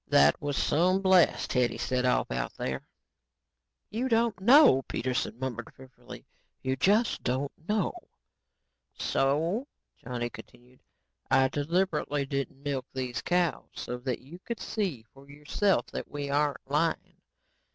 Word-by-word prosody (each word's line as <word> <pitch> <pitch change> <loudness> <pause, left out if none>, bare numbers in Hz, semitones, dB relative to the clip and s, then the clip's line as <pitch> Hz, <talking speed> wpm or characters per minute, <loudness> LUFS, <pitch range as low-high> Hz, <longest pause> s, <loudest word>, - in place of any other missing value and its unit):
That 70 +1 +5
was 145 -1 -2
some 185 +5 +2
blast 185 -3 +4
Hetty 125 -2 +1
set 125 0 -1
off 125 - +1
out - - -2
there." 65 0 -3 1.1
"You 240 +5 -1
don't 230 -3 +2
know," 260 - +7
Dr. 135 - -5
Peterson 125 -2 -2
murmured 120 -3 -5
fearfully, 130 -1 -13 0.4
"you 130 0 0
just 205 - +2
don't 130 +3 -1 0.2
know." 210 -3 +1 1.0
"So," 165 - 0 0.3
Johnny 120 -1 -4
continued, 125 +1 -15 0.5
"I 130 0 +4
deliberately 145 -1 0
didn't 140 0 -4
milk 140 -3 -2
these 130 -2 -3
cows, 175 -6 0
so 125 0 -5
that 125 -1 -3
you 160 +7 -12
could 235 +4 -6
see 175 - -3
for 135 +1 -17
yourself 150 +7 0
that - - -5
we 145 -1 -4
aren't 145 -1 +1
lying. 150 +4 -1
140 Hz, 135 wpm, -29 LUFS, 130-185 Hz, 1.1 s, know